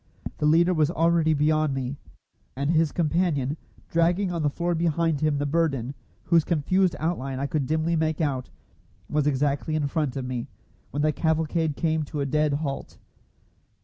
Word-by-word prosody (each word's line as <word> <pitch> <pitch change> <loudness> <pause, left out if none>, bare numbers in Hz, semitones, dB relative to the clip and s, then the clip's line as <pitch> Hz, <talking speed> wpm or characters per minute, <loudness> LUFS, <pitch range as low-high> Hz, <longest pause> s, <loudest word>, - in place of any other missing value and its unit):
The 150 - +2
leader 170 +4 +4
was 155 -3 +2
already 165 -2 +2
beyond 155 -1 +2
me, 135 +1 -3 0.6
and 140 +3 0
his 160 -2 +2
companion, 155 -4 0 0.3
dragging 175 +3 +1
on 170 - -2
the 150 - +2
floor 175 +4 -1
behind 165 -2 0
him 155 -2 +2
the 145 - -1
burden, 140 -5 0 0.3
whose 165 -1 +3
confused 180 +3 +1
outline 135 -5 -2
I 140 - -1
could 140 -2 -1
dimly 160 +2 +1
make 160 -1 0
out, 135 -5 -1 0.6
was 150 -1 0
exactly 145 +2 0
in 155 -2 0
front 140 -2 -1
of 135 -2 -3
me, 125 0 -4 0.4
when 145 +3 -2
the 155 - +3
cavalcade 160 0 0
came 160 0 0
to 145 - -5
a 140 - 0
dead 150 +1 +1
halt. 140 -1 -4
155 Hz, 170 wpm, -25 LUFS, 140-165 Hz, 0.6 s, leader